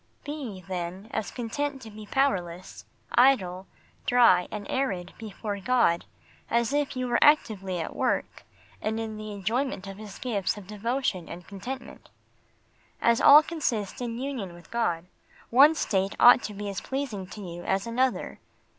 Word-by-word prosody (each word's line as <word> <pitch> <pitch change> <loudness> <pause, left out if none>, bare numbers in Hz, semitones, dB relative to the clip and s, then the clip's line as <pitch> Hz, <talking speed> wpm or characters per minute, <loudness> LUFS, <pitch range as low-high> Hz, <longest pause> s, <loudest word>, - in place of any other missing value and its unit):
Be, 270 -10 -6
then, 185 +3 -5
as 220 - -2
content 275 +4 -3
to 220 - -10
be 210 0 -10
powerless, 185 -10 -1 0.3
idle, 195 -8 +3 0.4
dry, 235 -8 +5
and 210 -1 -6
arid 195 -10 -2
before 210 -1 -5
God, 215 -6 +2 0.4
as 235 +3 +1
if 290 -2 0
you 255 0 -1
were 240 -1 +3
actively 195 - +3
at 160 - -5
work, - - -1 0.4
and 220 +1 -1
in 220 -1 -4
the 215 0 -6
enjoyment 215 +2 -2
of 195 +1 -8
His 210 -3 -9
gifts 210 -6 -1
of 205 - -9
devotion 210 -2 -2
and 175 +1 -9
contentment. 245 +6 -8 0.9
As 235 0 +3
all 295 +2 +9
consists 250 - -2
in 235 -1 -3
union 245 -9 -4
with 175 - -16
God 175 -8 0 0.5
one 285 +6 +7
state 195 -8 0
ought 245 +1 +8
to 210 - -6
be 205 +1 -5
as 195 -1 -4
pleasing 260 -9 -4
to 210 - -9
you 175 -2 -7
as 195 +2 0
another. 250 +2 -1
215 Hz, 155 wpm, -27 LUFS, 190-255 Hz, 0.9 s, all